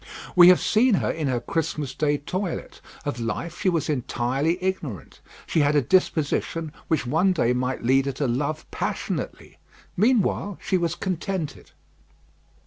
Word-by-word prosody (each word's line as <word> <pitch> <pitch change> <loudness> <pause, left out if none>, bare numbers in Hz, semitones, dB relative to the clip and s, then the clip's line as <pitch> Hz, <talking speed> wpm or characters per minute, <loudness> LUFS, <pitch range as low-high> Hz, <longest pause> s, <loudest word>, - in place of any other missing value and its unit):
We 175 -1 +9
have 180 0 +7
seen 225 +1 +3
her - - 0
in 155 -3 -2
her 125 -2 0
Christmas 150 -1 -2
day 145 0 +1
toilet. 185 +5 -4 0.2
Of 145 -4 -3
life, 135 +9 -4
she 195 - +3
was 165 -5 0
entirely 135 +3 0
ignorant. 165 - -4 0.3
She - - 0
had 145 0 +3
a 145 - +5
disposition 160 -1 +1 0.2
which 155 -6 0
one 160 +9 +2
day 125 -8 +2
might 125 +1 -2
lead 135 +3 +3
her - - +1
to 135 +1 -1
love 145 +6 -2
passionately. - - -4 0.4
Meanwhile 205 -2 +1
she - - -1
was 170 -2 0
contented. 185 -3 -4
155 Hz, 150 wpm, -24 LUFS, 135-180 Hz, 0.4 s, We